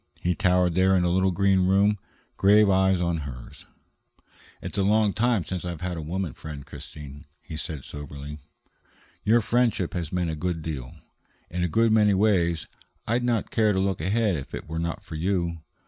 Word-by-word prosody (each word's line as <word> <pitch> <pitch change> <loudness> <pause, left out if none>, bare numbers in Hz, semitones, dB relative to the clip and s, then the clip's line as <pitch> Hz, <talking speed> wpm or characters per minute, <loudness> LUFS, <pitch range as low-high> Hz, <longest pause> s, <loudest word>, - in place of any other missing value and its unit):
He 90 - +1
towered 90 -2 +2
there 95 +2 +4
in 90 - +3
the 90 - +2
little 95 +1 +2
room, 100 +2 +3 0.4
grave 105 +1 +5
eyes 95 -1 +3
on 85 -1 0
hers. 70 -5 -9 0.9
"It's - - -5
a - - +3
long 105 +1 +3
time 115 -6 +1
since 90 +1 -4
I 90 - -3
have 85 -3 -6
had 90 -1 -3
a 80 - -4
woman 85 0 -3
friend, 75 -3 -8
Christine," 75 +1 -10
he 80 - -9
said 80 -3 -5
soberly. 75 +1 -8 0.8
"Your 115 +3 +4
friendship 115 -5 +1
has 85 -4 -3
meant 90 -2 -1
a - - -3
good 85 0 -3
deal. 70 -6 -5 0.6
In 90 +1 -1
a - - +2
good 115 +6 +2
many 105 -2 +4
ways, 90 -5 +2 0.4
I'd 120 +2 +1
not 120 -3 0
care 110 -2 +3
to 95 - 0
look 95 -3 0
ahead 100 +2 +1
if 70 -3 -6
it - - -8
were 80 +1 -4
not 85 0 -3
for - - -10
you. 85 0 -1
90 Hz, 190 wpm, -26 LUFS, 80-100 Hz, 0.9 s, grave